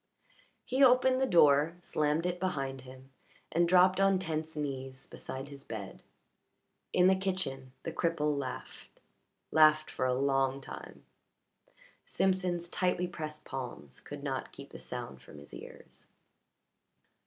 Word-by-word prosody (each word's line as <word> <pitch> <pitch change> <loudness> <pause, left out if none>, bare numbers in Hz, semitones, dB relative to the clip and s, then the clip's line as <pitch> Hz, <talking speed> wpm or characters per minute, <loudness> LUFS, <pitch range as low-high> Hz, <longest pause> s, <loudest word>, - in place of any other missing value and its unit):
He 260 +2 +2
opened 255 0 +5
the 265 - +3
door, 155 - +5
slammed 155 -1 0
it 180 0 -1
behind 135 -8 -2
him, 130 +1 -13 0.4
and 170 +1 +3
dropped 185 +1 +5
on 195 -1 +4
tense 160 -3 -3
knees 135 -3 -4
beside 135 +2 -7
his 140 -1 -11
bed. 100 -4 -7 0.9
In 180 - +4
the 190 +1 +6
kitchen 180 -9 -3
the 165 - -3
cripple 160 -3 0
laughed 135 -2 -7 0.5
laughed 155 0 +5
for 130 - -1
a 125 - +1
long 135 0 +1
time. 135 - -10 1.0
Simpson's 185 -2 0
tightly 180 0 0
pressed 155 -3 -7
palms 120 - -7
could - - -9
not - - -3
keep - - -12
the - - -9
sound 65 0 -7
from - - -14
his 70 0 -13
ears. - - -12
155 Hz, 135 wpm, -31 LUFS, 135-180 Hz, 1.0 s, the